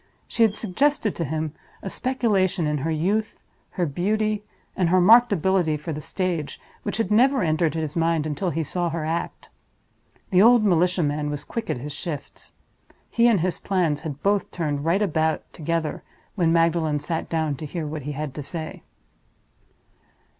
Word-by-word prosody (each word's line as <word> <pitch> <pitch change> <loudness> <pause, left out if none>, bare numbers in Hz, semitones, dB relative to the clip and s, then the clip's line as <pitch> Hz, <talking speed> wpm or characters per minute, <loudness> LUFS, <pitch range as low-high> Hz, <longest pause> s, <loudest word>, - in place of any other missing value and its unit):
She - - -3
had 220 -2 +5
suggested 225 +2 0
to 170 - -2
him 155 0 -3 0.3
a - - -5
speculation 210 -9 +1
in 150 -1 0
her 155 +5 -2
youth, 195 +8 0 0.4
her 180 - 0
beauty, 210 +7 0 0.3
and 180 -3 +1
her 185 +1 +4
marked 230 +6 +7
ability 185 -4 +2
for 150 +2 -5
the 150 - -5
stage, 175 -4 -2 0.2
which - - -4
had 225 -3 -1
never 260 +5 +4
entered 160 -1 +1
his 155 -2 -3
mind 165 -2 +1
until 155 +4 -2
he 165 0 -1
saw 175 +3 -1
her 160 -1 -3
act. 165 +2 -4 0.8
The 185 0 +5
old 235 +1 +6
militia 180 -1 +3
man 150 0 -1
was 145 -1 -4
quick 225 -2 -5
at - - 0
his 145 +4 -6
shifts. 145 -1 -7 0.6
He 235 +1 +4
and 220 -7 +3
his 180 +1 -1
plans 175 -7 0
had 145 -3 -7
both 200 0 +1
turned 145 -4 -2
right 185 +5 +2
about 160 -4 0
together 165 0 -2 0.3
when 170 -5 +2
Magdalen 165 -2 +2
sat 165 +2 -3
down 160 -2 0
to 155 - -6
hear 165 +1 -4
what 150 0 -5
he 145 +2 -5
had 150 -1 -4
to 150 - -5
say. 155 +2 -6
165 Hz, 175 wpm, -24 LUFS, 155-195 Hz, 0.8 s, marked